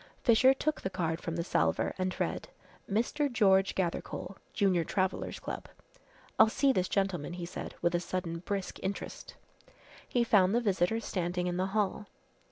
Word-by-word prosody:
Fisher 240 +2 +6
took 290 +3 -1
the 190 - -2
card 170 -3 -2
from 165 - -3
the 170 - -1
salver - - +1
and 185 0 -2
read, - - -2 0.4
"Mr. 245 +7 0
George 195 -4 +4
Gathercole, 180 +1 -2 0.2
Junior 190 -4 +2
Travellers' 185 +2 -1
Club." - - -6 0.7
"I'll 220 - +8
see 275 +4 +3
this 185 -5 0
gentleman," 190 -6 -1
he 175 -1 -5
said, 175 - -7
with 170 - +2
a 175 - +2
sudden 170 -1 -3
brisk 195 +2 -4
interest. 195 +1 -5 0.7
He 245 - +2
found 200 -3 +4
the - - +4
visitor 205 +1 +1
standing 180 -3 -2
in 175 0 -1
the 185 +1 +1
hall. 210 0 0
190 Hz, 165 wpm, -31 LUFS, 175-215 Hz, 0.7 s, I'll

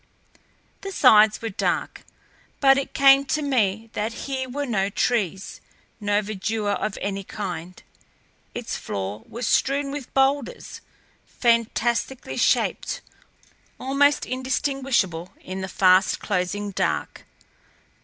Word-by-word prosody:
The 395 - -6
sides 215 - +5
were 225 - -2
dark, - - -2 0.5
but 270 -1 +6
it 275 - -6
came 275 0 +7
to 300 +3 -1
me 225 -5 0
that 215 +2 -2
here 265 -2 -3
were 285 +3 -3
no 200 -6 0
trees, 195 -4 -1 0.4
no 205 0 +1
verdure 210 +1 -2
of 215 0 -3
any 195 0 -3
kind. 180 -4 -6 0.7
Its - - -4
floor 100 +2 -5
was 235 +2 -5
strewn 275 +4 +1
with 285 -3 -7
boulders, 270 -1 0 0.5
fantastically 235 +2 0
shaped, - - +1 0.8
almost 280 +2 +2
indistinguishable 255 - -1
in 190 +1 -6
the 190 - -3
fast 185 0 +3
closing 200 +1 -2
dark. - - -2
225 Hz, 115 wpm, -24 LUFS, 195-270 Hz, 0.8 s, came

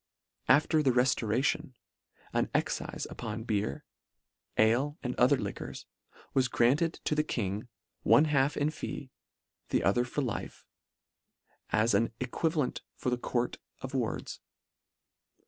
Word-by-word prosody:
After 155 +1 +5
the 140 - +3
reftoration, 125 0 +1 0.6
an - - +2
excife - - -1
upon 110 0 -5
beer, 105 - -1 0.7
ale 130 +7 +3
and 125 -1 -1
other 130 +3 +5
liquors, 100 -5 -5 0.5
was 130 -1 +3
granted 140 +8 +3
to - - 0
the 150 - +3
g 150 - -8
King, 105 0 -2 0.3
one 150 - +6
half 140 -2 +2
in 145 +1 +1
fee, 140 -3 -6 0.6
the - - +1
other 110 +5 +3
for 130 +4 -2
life, 120 -5 -4 1.0
as 110 +1 +3
an 110 +3 +3
e 130 - -1
quivalent 150 +1 -1
for 125 - -2
the 125 - +1
court 120 0 -1 0.2
of - - -6
wards. - - -2
125 Hz, 130 wpm, -30 LUFS, 115-145 Hz, 1.0 s, one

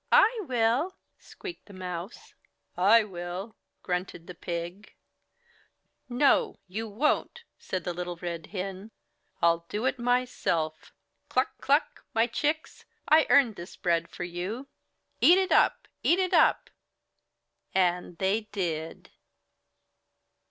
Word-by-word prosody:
"I 450 +3 +6
WILL," 245 +8 +1 0.2
squeaked 370 -4 -10
the 200 - -13
Mouse. 180 +2 -7 0.4
"I 210 +5 +6
WILL," 185 +2 -6 0.3
grunted 180 -2 -3
the 180 - -8
Pig. 175 +4 -6 1.1
"NO! 255 +3 +3
YOU 220 +4 -4
WON'T," 300 - 0 0.2
said 185 -2 -4
Little 175 0 -3
Red 170 -2 -5
Hen, 195 +1 -5 0.5
"I'll 170 0 +3
do 215 +4 -2
it 260 - 0
myself. 240 -10 0 0.4
Cluck! - - +1
Cluck! 285 +3 +1
my 225 +1 +4
chicks! 300 +6 -2 0.2
I 310 +1 +5
earned 245 -7 +5
this 170 +1 -9
bread 170 -2 0
for - - -6
you! 180 +9 -5 0.5
Eat 355 - +7
it 380 0 +1
up! - - +3
Eat 345 - +4
it 370 -1 0
up!" - - +4 1.0
And 180 -2 +1
they 205 +4 0
did. 165 -5 -4
195 Hz, 115 wpm, -28 LUFS, 175-245 Hz, 1.1 s, Eat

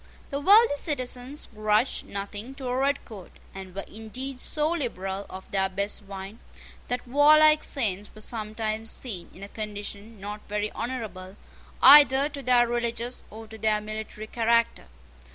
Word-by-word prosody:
The 280 - -2
wealthy 400 +1 +6
citizens 255 -1 -3
grudged 215 +3 0
nothing 205 +6 -6
to 270 - -8
a 250 0 -1
redcoat, 260 -8 -2 0.2
and 190 -1 -9
were 195 - -4
indeed 250 +5 -8
so 305 +1 0
liberal 200 - -3
of 190 0 -10
their 190 -1 +1
best 200 +3 -2
wine, 195 +2 -9 0.5
that 245 0 -3
warlike 305 +3 +6
saints 210 -7 -1
were 215 - -9
sometimes 220 0 -3
seen 195 -9 -3
in 190 - -12
a - - -6
condition 210 0 -7
not 205 +2 -6
very 210 0 -2
honourable 215 -6 -6 0.5
either 285 -1 +8
to 285 -2 -7
their 245 -2 +4
religious 235 +1 -3
or 220 +1 -10
to 220 0 -12
their 215 0 +2
military 215 0 -7
character. 230 - +1
220 Hz, 150 wpm, -26 LUFS, 205-260 Hz, 0.5 s, either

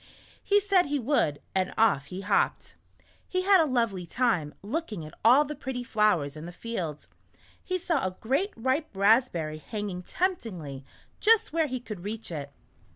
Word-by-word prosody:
He 410 0 +4
said 390 -4 +3
he 290 +1 0
would, 235 - 0
and 185 -1 0
off 200 -11 +3
he 180 +6 -7
hopped. - - 0 0.5
He 370 0 -1
had 385 -2 +6
a 315 - +2
lovely 225 -8 0
time, 180 -10 0
looking 215 - -4
at 155 - -11
all 255 +7 +7
the 300 - -5
pretty 260 -4 -5
flowers 210 -11 +1
in 155 +2 -8
the - - -7
field. 175 -7 -5 0.6
He 370 - -1
saw 335 -5 0
a 185 - -7
great, 275 - 0
ripe 260 +6 0
rasp 220 +6 +4
berry 155 -2 -4
hanging 205 0 -5
temptingly 180 - -3 0.4
just 445 -4 +4
where 325 -1 +2
he 255 -2 -3
could 215 -5 -7
reach 215 0 -5
it. 145 -3 -5
225 Hz, 170 wpm, -28 LUFS, 180-295 Hz, 0.6 s, all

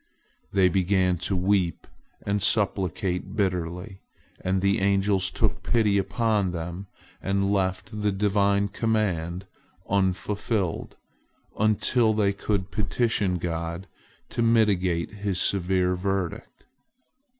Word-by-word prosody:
They 95 -1 +4
began 90 0 +2
to 95 +3 -2
weep 90 -2 +1 0.4
and 100 0 0
supplicate 95 -2 0
bitterly, 90 0 -2 0.4
and 95 +1 +1
the 100 +1 +2
angels 95 -1 +2
took - - -1
pity 105 -4 +2
upon 100 -1 0
them 85 +3 -5 0.3
and 100 0 0
left 100 +3 -2
the 105 0 +2
Divine 100 0 +2
command 95 -5 -1 0.4
unfulfilled, 100 0 -1 0.6
until 110 +1 +2
they 100 -2 +2
could 100 -1 -2
petition 105 -3 0
God 85 +1 -4 0.4
to - - -2
mitigate 100 -7 +2
His 100 -3 -2
severe 90 -1 +1
verdict. 95 -1 -3
95 Hz, 105 wpm, -26 LUFS, 90-105 Hz, 0.6 s, They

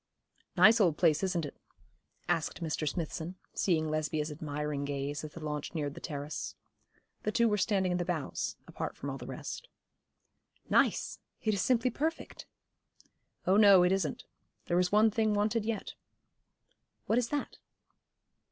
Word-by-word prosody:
'Nice 225 +1 +7
old 170 -6 +3
place, 155 -3 +4
isn't 180 -4 0
it?' 145 - -9 0.7
asked 160 - 0
Mr. 155 -1 -1
Smithson, 165 +3 -4 0.2
seeing 160 -4 +1
Lesbia's 155 0 -1
admiring 150 -1 -3
gaze 140 +1 -3
as 155 - -7
the - - -8
launch 150 +2 -4
neared 145 -3 -2
the - - -9
terrace. 145 -1 -5 0.7
They - - -1
two 235 +2 +3
were 210 -1 +1
standing 190 -1 +2
in 180 - 0
the - - +1
bows, 170 -5 -2
apart - - -5
from - - -4
all - - -6
the - - -8
rest. - - -6 1.0
'Nice! - - +2 0.2
it 215 - +2
is 195 - 0
simply 250 +2 +2
perfect.' 315 +7 -3 1.0
'Oh 190 +2 +4
no, 200 -4 +8
it 180 - +3
isn't. 185 -7 -1 0.4
There 175 - +2
is 180 0 +1
one 215 +1 +5
thing 215 -1 +1
wanted 210 +1 +1
yet.' 220 -2 -3 1.1
'What 225 - +3
is 235 -2 -1
that?' 290 -1 -3
180 Hz, 155 wpm, -31 LUFS, 155-210 Hz, 1.1 s, no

